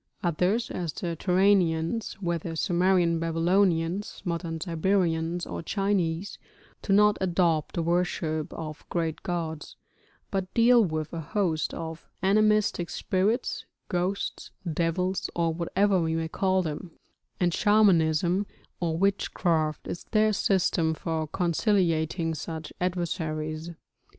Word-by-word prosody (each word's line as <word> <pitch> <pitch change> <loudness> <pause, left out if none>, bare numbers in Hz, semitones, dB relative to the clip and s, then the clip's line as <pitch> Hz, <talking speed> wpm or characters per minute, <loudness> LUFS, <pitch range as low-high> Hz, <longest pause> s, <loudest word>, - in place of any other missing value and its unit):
Others, 180 +7 +1
as 175 -3 -3
the 170 -2 -3
Turanians, 185 +2 +2
whether 170 -3 -3
Sumerian 175 -1 +2
Babylonians, 170 +2 +1
modern 170 -2 -3
Siberians, 170 0 0
or - - -5
Chinese, 195 -1 -1 0.4
do - - -3
not 210 +1 +5
adopt 170 -4 +1
the 170 - 0
worship 165 -2 -1
of 155 -2 -7
great 165 -2 -2
gods, 165 -3 -4 0.6
but 190 -2 -2
deal 235 0 +6
with 155 -4 -3
a 165 - -3
host 165 0 -1
of 160 -1 -7 0.2
animistic 210 -3 +3
spirits, 205 +6 -1 0.2
ghosts, 185 +1 -2 0.2
devils, 180 +4 0
or 165 -1 +1
whatever 185 +3 +1
we 160 0 0
may 165 0 -1
call 190 +2 +1
them; 160 +3 -5 0.5
and 175 -2 +2
Shamanism 185 -3 +3 0.3
or 165 -2 -1
witchcraft 170 -4 0
is 175 - -6
their 215 -1 +2
system 175 -5 +1
for 160 -1 -2
conciliating 170 -2 +1
such 160 0 -6
adversaries. 160 -3 -2
175 Hz, 115 wpm, -27 LUFS, 160-190 Hz, 0.6 s, deal